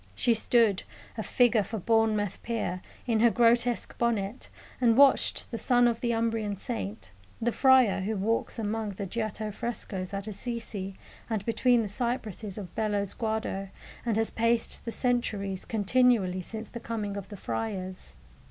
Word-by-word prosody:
She 235 - +3
stood, 225 -3 +3 0.3
a - - -3
figure 245 -3 +3
for 220 +3 -4
Bournemouth 215 -1 +1
pier, 215 -6 -2 0.2
in 230 -3 +1
her 235 +1 +6
grotesque 240 +1 +2
bonnet, 230 -1 -1 0.3
and 230 -2 +4
watched 280 -1 +4
the 230 - -3
son 245 -1 +4
of 235 -1 -1
the 235 - +1
Umbrian 225 -3 0
saint 105 - -5 0.3
the 240 +1 +1
friar 255 -7 +5
who 215 +3 -1
walks 225 +4 0
among 215 -1 -2
the 195 +1 -5
Giotto 215 +1 -3
frescoes 200 -4 -4
at 195 0 -4
Assisi 210 -3 -5 0.3
and 215 -3 -2
between 235 +1 +3
the - - -3
cypresses 220 -3 -3
of 195 -4 -7
Bello 210 -2 0
Sguardo, 210 -1 -3 0.3
and 230 -3 0
has 225 0 +1
paced 230 0 0
the 230 - -3
centuries 210 -6 -1
continually 215 -4 +2
since 220 +3 -7
the 235 - -7
coming 215 -3 -4
of 200 -2 -6
the 205 - -8
friars. 185 - -4
220 Hz, 155 wpm, -28 LUFS, 200-235 Hz, 0.3 s, her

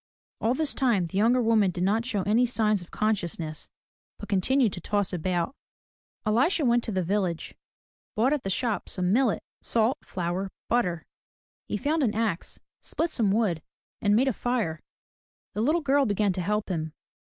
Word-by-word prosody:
All 230 +3 +1
this 310 0 +1
time 235 -9 +2
the 170 +3 -5
younger 240 +3 +4
woman 220 -3 +4
did 180 0 -3
not 215 +5 +1
show 205 -6 -1
any 215 +6 +3
signs 215 -4 +1
of 175 - -12
consciousness 170 -7 -2 0.5
but - - -8
continued 215 +4 +2
to 175 - -6
toss 205 +1 0
about. 180 - -1 0.7
Elisha 270 - +2
went 240 -1 +3
to - - -3
the 190 -2 0
village, 180 -2 -1 0.6
bought 240 +6 +3
at 295 - 0
the 195 - -4
shop 225 +2 -1
some 185 0 0
millet, 245 -2 +2 0.2
salt, 230 +3 +1
flour, 180 +2 -3 0.2
butter. 180 -9 +1 0.6
He - - -2
found 305 +9 0
an 225 -6 +1
axe, 220 -6 -2 0.2
split 330 0 -2
some 220 -8 +2
wood, 200 -7 +1 0.4
and 205 0 +3
made 255 +5 +3
a 265 - +2
fire. 220 -10 -1 0.7
The 210 - -2
little 310 +8 +2
girl 280 -1 +3
began 205 -1 +1
to 185 - -3
help 210 +4 -1
him. 160 -3 -3
210 Hz, 175 wpm, -27 LUFS, 185-245 Hz, 0.7 s, younger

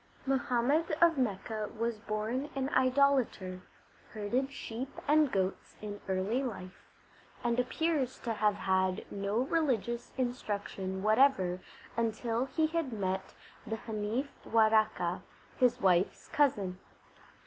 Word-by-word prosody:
Muhammad 270 +4 +1
of 335 -1 +6
Makka 215 -3 -2
was 230 -1 -1
born 225 +6 -2
an 270 0 -1
idolater, 255 -9 +2 0.5
herded 240 +6 -1
sheep 255 -1 -5 0.2
and 300 -2 +4
goats 190 0 -2
in 205 -1 -6
early 195 +7 0
life, 195 -8 -6 0.6
and 240 0 +1
appears 275 0 0
to 230 - -1
have 210 -1 +2
had 190 0 +1
no 200 +3 0
religious 255 -5 0
instruction 200 -6 -3
whatever 215 -6 +4 0.4
until 230 +1 0
he 315 +4 +1
had 320 -4 -1
met 190 -3 -3 0.3
the 220 +1 -2
Hanif 220 +5 -2
Waraka, 215 -5 +3 0.4
his 250 -1 +4
wife 185 0 +4
s - - -20
cousin. 205 -11 +1
230 Hz, 115 wpm, -32 LUFS, 200-265 Hz, 0.6 s, of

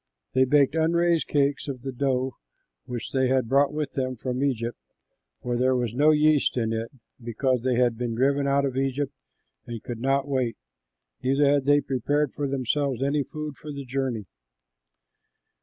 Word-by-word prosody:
They 130 0 +4
baked 140 +1 +4
unraised 170 +1 +2
cakes 140 0 +1
of 130 -3 -5
the 135 - -3
dough 130 0 -1 0.5
which 120 -2 -5
they 130 -1 +2
had 130 -2 +1
brought 140 +3 +3
with 150 -2 -3
them 130 -1 -2
from 125 +3 -3
Egypt, 120 -4 -1 0.7
for 120 0 -1
there 130 +1 +2
was 120 -3 -1
no 145 +5 +4
yeast 150 -3 +3
in 115 -2 0
it, 115 +1 -3 0.3
because 125 +2 0
they 125 0 +1
had 120 -2 +2
been 120 -2 -2
driven 140 +3 +2
out 140 0 +2
of 135 -2 -2
Egypt 135 +1 -1 0.5
and 115 -2 -6
could 120 -2 -6
not 135 +1 +1
wait, 130 -4 -1 0.6
neither 135 +3 +2
had 140 -1 +3
they 145 0 +5
prepared 145 +2 0
for 145 - -2
themselves 135 0 -1
any 140 +1 +1
food 150 0 -6
for 150 - -8
the 140 -1 -6
journey. 125 -4 -2
135 Hz, 175 wpm, -26 LUFS, 125-145 Hz, 0.7 s, they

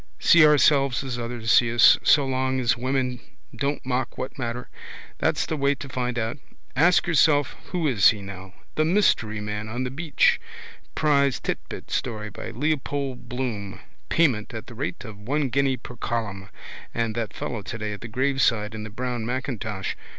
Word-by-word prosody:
See 170 -2 +6
ourselves 140 -3 +4
as 125 -3 -4
others 115 -2 -2
see 120 -2 +5
us. 120 -1 +7
So 145 -2 +5
long 130 0 0
as 120 -2 +2
women 125 0 -1 0.4
don't 140 -1 -2
mock 130 -1 -2
what 130 +3 -5
matter? 120 0 -4 0.5
That's - - +1
the 160 - -2
way 140 -1 +2
to 140 - -8
find 125 -2 -3
out. 115 +4 -2 0.4
Ask 170 -1 +4
yourself 145 -3 +3
who 175 -4 -1
is 115 -8 +5
he 105 - -1
now. 95 0 -9 0.2
The 155 - +2
Mystery 155 - +2
Man 105 +1 -4
on 120 +3 -3
the 125 - -3
Beach, 150 +1 +2 0.5
prize 140 -3 +2
titbit - - -5
story 105 -2 -3
by 115 - -7
Mr 120 +3 -10
Leopold 140 -4 -2
Bloom. 115 -6 -4 0.3
Payment 130 -11 +2
at 110 - -6
the - - -11
rate 90 -1 -4
of 105 -3 -9
one 135 +6 -1
guinea 135 +1 +1
per 125 - -10
column. 100 -5 -3 0.5
And 115 -2 0
that 110 -2 -3
fellow 115 -4 -5
today 105 0 -5
at 105 - -9
the 120 - -6
graveside 120 -3 +1
in 110 - -6
the 110 - -7
brown 120 +1 -3
macintosh. 115 -5 -3
125 Hz, 175 wpm, -25 LUFS, 110-140 Hz, 0.5 s, us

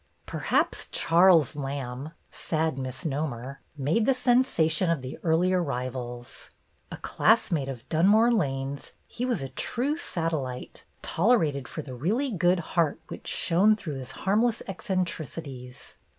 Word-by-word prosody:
Perhaps - - 0
Charles 170 -4 +4
Lamb 135 +1 -5
— - - -40
sad 160 -3 -1
misnomer 135 0 -3
— - - -33
made 155 +11 +1
the 270 - +4
sensation 240 - +2
of 160 -6 0
the 130 - -7
early 170 +3 +2
arrivals. 125 -7 -3 0.4
A - - -5
classmate 140 -5 +2
of 125 -4 -7
Dunmore 210 +9 +4
Lane's, 140 - -2
he 245 - -4
was 245 - 0
a 135 - -5
true 250 - -1
satellite, 160 - -3 0.2
tolerated 160 - +2
for 155 - -6
the 130 - -8
really 215 - 0
good 180 -2 +2
heart 165 -4 +2
which - - -8
shone 195 +6 +3
through 155 -10 -6
his 130 0 -7
harmless 215 - +1
eccentrici 180 -5 -2
ties. 125 -3 -9
160 Hz, 135 wpm, -27 LUFS, 135-190 Hz, 0.4 s, Charles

